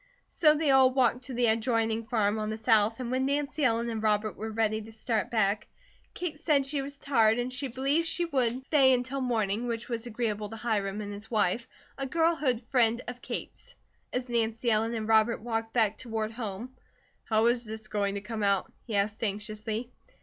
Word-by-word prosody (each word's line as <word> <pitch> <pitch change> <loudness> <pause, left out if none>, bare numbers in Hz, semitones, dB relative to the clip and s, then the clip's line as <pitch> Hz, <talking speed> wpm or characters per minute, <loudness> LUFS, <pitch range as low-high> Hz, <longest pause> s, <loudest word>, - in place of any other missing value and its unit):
So 305 -2 +3
they 300 -2 +2
all 265 -1 +6
walked 255 -1 +1
to 255 -1 -6
the 245 0 +2
adjoining 225 0 +1
farm 215 -2 +1
on 215 0 -2
the 215 - -3
south 225 0 +3
and 250 -1 -4
when 260 +1 +1
Nancy 290 +1 -1
Ellen 230 -2 +2
and 225 -2 -3
Robert 215 -1 +1
were 220 +2 -5
ready 220 0 0
to 220 +1 -11
start 225 -1 -2
back, 210 -3 +1 0.5
Kate 320 -4 -4
said 300 -4 +2
she 280 0 -1
was 280 +1 -7
tired 225 -6 +3
and 245 +1 -2
she 270 +2 -3
believed 275 +6 0
she 345 +1 +1
would 260 -4 0
stay 270 -4 +5
until 255 +2 -1
morning, 225 -2 0
which 235 0 -4
was 235 0 -3
agreeable 215 -3 -2
to 225 - -7
Hiram 215 -3 -1
and 205 -1 -5
his 205 +2 -8
wife, 220 +1 +1 0.3
a 270 - -2
girlhood 305 -5 +1
friend 235 -1 +2
of 245 0 -6
Kate's. - - -7 0.4
As 250 0 -2
Nancy 230 0 0
Ellen 225 +2 +1
and 220 -1 -3
Robert 220 +1 +3
walked 225 0 -3
back 220 -3 +2
toward 225 -3 -3
home: 225 +2 -6 0.5
"How 220 0 +2
is 240 0 +2
this 220 -1 -7
going 200 -2 -1
to 200 - -3
come 220 +1 -5
out?" 200 -1 +1
he 225 - -4
asked, 205 +3 0
anxiously. 215 +3 -3
230 Hz, 200 wpm, -29 LUFS, 215-255 Hz, 0.5 s, all